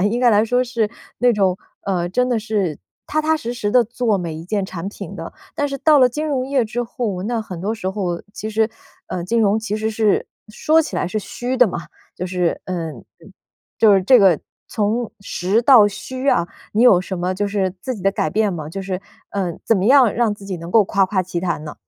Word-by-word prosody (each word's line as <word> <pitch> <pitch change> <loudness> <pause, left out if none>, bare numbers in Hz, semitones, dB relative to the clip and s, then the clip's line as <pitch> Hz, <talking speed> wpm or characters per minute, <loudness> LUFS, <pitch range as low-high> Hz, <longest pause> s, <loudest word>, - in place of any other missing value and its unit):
应 205 +4 +1
该 245 -1 +4
来 210 -1 +4
说 245 +3 +1
是 235 -4 -1 0.3
那 245 0 +4
种， 190 -3 +2 0.3
呃， 180 -3 -1
真 250 +8 +1
的 240 - +2
是 210 -8 -2 0.3
踏 310 - 0
踏 315 +1 +2
实 240 -6 -4
实 210 -4 -2
地 245 +1 +5
做 230 -1 0
每 170 -4 -4
一 160 - -7
件 200 +2 -1
产 185 -1 -5
品 200 -2 -8
的。 165 -3 -7 0.2
但 290 - 0
是 275 - -4
到 305 +1 +5
了 255 -2 +6
金 300 +6 -3
融 265 -4 -1
业 270 -3 +1
之 230 +3 -3
后， 225 -6 -3
那 230 +1 -1
很 185 -6 -8
多 210 +5 -1
时 190 -4 -3
候 185 -4 -3
其 215 - -5
实 220 +1 +1 0.4
呃， 180 -1 -3
金 230 +7 0
融 210 -1 +3
其 220 -1 -3
实 220 +1 -1
是 215 -2 +1 0.2
说 310 +9 +2
起 320 - -4
来 - - 0
是 215 +4 -2
虚 245 +4 -4
的 250 - +7
嘛， - - -4 0.4
就 180 - -3
是 180 -2 0
嗯 165 -5 -4
嗯， 115 - -14 0.7
就 220 -2 +6
是 190 - +3
这 250 +7 +6
个 190 -7 +5 0.3
从 220 +2 -1
实 200 +2 0
到 235 -5 +7
虚 260 +6 -5
啊， 170 -9 +3 0.3
你 220 - +2
有 220 -8 +7
什 185 0 -5
么 180 +2 -1
就 205 +2 -1
是 195 -2 -1
自 255 +6 -3
己 195 - -10
的 195 - +3
改 155 - 0
变 210 +2 +1
吗？ 155 -4 -5
就 195 +5 -5
是， 190 -1 -4 0.3
呃， 190 -3 -1
怎 225 - +3
么 190 +1 0
样 255 -4 +6
让 235 -2 +2
自 205 - -14
己 195 -2 -4
能 170 +1 -8
够 215 +2 +5
夸 195 -1 +2
夸 185 -1 0
其 175 -1 -4
谈 170 -4 -2
呢？ 150 - -7
210 Hz, 255 characters per minute, -20 LUFS, 185-240 Hz, 0.7 s, 的